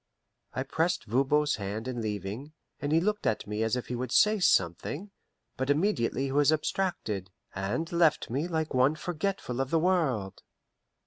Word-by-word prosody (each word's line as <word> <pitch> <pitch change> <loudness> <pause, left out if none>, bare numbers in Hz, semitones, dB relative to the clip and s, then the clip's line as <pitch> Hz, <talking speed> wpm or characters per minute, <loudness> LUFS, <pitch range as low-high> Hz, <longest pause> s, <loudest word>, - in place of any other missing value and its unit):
I 130 - 0
pressed 160 +4 0
Voban's 140 +6 +2
hand 105 +3 -4
in 125 -2 -3
leaving, 105 - -4 0.3
and 145 - -2
he 160 - +5
looked 210 +4 0
at 110 - 0
me 105 +1 -3
as 110 +1 +1
if 125 - -3
he - - -5
would 125 0 -4
say 210 +9 +5
something; 155 - +1 0.5
but 130 +1 -2
immediately 145 - +1
he 135 - -2
was 145 +2 +4
abstracted, 150 - -1 0.2
and 100 +13 -2
left 170 -3 +3
me 140 +8 -1
like 160 -2 -2
one 130 +4 +4
forgetful 160 -6 -2
of 135 - -2
the 165 - +2
world. 150 - 0
140 Hz, 170 wpm, -29 LUFS, 115-165 Hz, 0.5 s, he